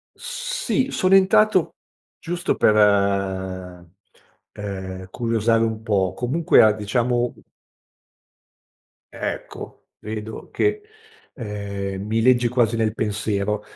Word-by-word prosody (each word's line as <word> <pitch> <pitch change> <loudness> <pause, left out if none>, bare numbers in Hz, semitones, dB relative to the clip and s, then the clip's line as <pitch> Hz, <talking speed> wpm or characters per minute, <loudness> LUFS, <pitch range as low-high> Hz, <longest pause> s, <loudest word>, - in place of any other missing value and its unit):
Sì, - - -2
sono 185 +1 +2
entrato 195 -1 +4 0.4
giusto 175 +1 -2
per, 105 - +4 1.8
ehm, 95 -2 -6
curiosare 115 0 +1
un 110 -1 -3
po', 95 -4 +1
comunque 145 +7 +3
a 110 -1 +6
diciamo 120 +3 0 1.8
Ecco. - - -6
Vedo 110 0 -7
che, 420 0 0 0.5
ehm, 100 -4 -5
mi 110 +1 0
leggi 120 -1 +4
quasi 115 -2 +1
nel 110 -1 0
pensiero 105 -1 -1
115 Hz, 90 wpm, -22 LUFS, 105-145 Hz, 1.8 s, a